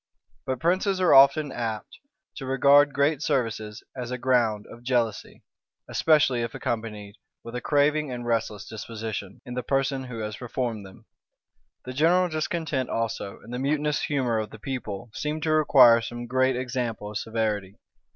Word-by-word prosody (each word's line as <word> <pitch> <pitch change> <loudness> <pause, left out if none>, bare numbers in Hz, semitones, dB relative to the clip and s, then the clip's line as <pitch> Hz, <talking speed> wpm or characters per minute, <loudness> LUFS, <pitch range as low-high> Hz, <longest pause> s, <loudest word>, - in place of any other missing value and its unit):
But 130 -1 -2
princes 185 +3 +1
are 180 -2 +4
often 140 +2 +6
apt 115 -3 -5 0.4
to 135 - -6
regard 140 +2 +5
great 140 +1 +1
services 115 -7 -2
as 125 -2 -5
a 125 - -3
ground 120 -5 +1
of 120 - -13
jealousy, 120 -4 -2 0.4
especially 145 -6 +3
if 115 0 -4
accompanied 105 -3 -4 0.3
with 115 - -9
a 125 - -3
craving 150 0 +2
and 120 -1 -5
restless 115 -3 -2
disposition 110 -3 -6
in 125 - -7
the 125 - -2
person 135 +1 -1
who 125 -2 -7
has 105 -1 -5
performed 120 -4 -4
them. 95 - -17 0.8
The 130 - -6
general 175 +6 +3
discontent 155 -4 -2
also, 115 -3 -3
and - - -12
mutinous 150 +1 0
humor 125 -6 0
of 110 - -4
the - - -11
people, 110 -3 -6
seemed 150 +3 -3
to 160 - +1
require 130 -6 +6
some 120 +1 -6
great 130 +1 +2
example 120 -4 -3
of 105 - -3
severity. 105 -3 -2
125 Hz, 160 wpm, -26 LUFS, 115-145 Hz, 0.8 s, often